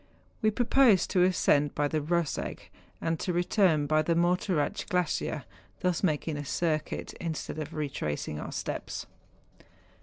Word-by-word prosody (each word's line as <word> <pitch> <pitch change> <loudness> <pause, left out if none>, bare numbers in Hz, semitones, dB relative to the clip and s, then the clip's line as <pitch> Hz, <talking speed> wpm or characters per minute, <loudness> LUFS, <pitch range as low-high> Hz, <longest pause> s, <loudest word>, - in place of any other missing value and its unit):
We 215 - +4
pro¬ 235 +2 -1
posed 245 -9 +5
to 185 - +3
ascend 150 -5 +3
by 145 0 +2
the 155 +1 -1
Eoseg, 170 +1 -1 0.4
and 165 -1 -1
to 180 - -1
return 175 -3 +3
by 155 +1 +3
the 165 +2 +1
Morteratsch 175 -2 +1
glacier, 175 -4 0 0.4
thus 180 -2 +1
making 155 -3 0
a 145 - -4
circuit, 155 +1 -2
instead 160 -1 -4
of 155 +2 -5
retracing 75 - -3
our - - -6
steps. - - -4
165 Hz, 145 wpm, -29 LUFS, 150-180 Hz, 0.4 s, posed